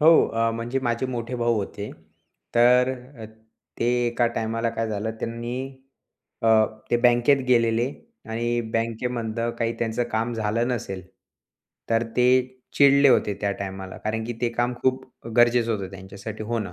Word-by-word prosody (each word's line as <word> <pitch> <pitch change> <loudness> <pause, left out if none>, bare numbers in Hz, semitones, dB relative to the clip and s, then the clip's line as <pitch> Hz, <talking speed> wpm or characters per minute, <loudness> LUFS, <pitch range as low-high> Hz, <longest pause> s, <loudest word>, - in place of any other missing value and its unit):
हो 160 +2 +7
आ, 115 0 +1
म्हणजे 115 +3 -2
माझे 120 +1 0
मोठे 120 -1 -4
भाऊ 120 0 +1
होते, 105 0 -4 0.6
तर 125 +2 +5 0.3
अ, 110 - -7 0.6
ते 115 - +2 0.2
एका 120 0 +1
टाइमाला 115 +1 -1
काय 115 0 -2
झालं 110 +1 -2
त्यांनी 115 +1 -4 0.9
अ, 115 - +3 0.4
ते 120 - +4
बँकेत 120 +3 +5
गेलेले 115 0 +3 0.4
आणि 120 +1 0
बँकेमधनं 115 0 -1
काही 115 0 0
त्यांचं 115 +1 -1
काम 115 +2 0
झालं 115 +2 0
नसेल, 100 -6 -3 0.9
तर 115 0 +3
ते 125 - +4 0.5
चिडले 140 0 +6
होते 120 -5 +3
त्या 100 - 0
टायमाला, 95 -1 -6
कारण 110 +1 -3
की 120 - -3
ते 120 - +2
काम 120 +1 0
खूप 130 0 +1 0.3
गरजेचं 120 -1 +4
होतं 100 -3 -4
त्यांच्यासाठी 100 +3 -8
होणं. 110 -4 -3
115 Hz, 145 wpm, -24 LUFS, 110-120 Hz, 0.9 s, हो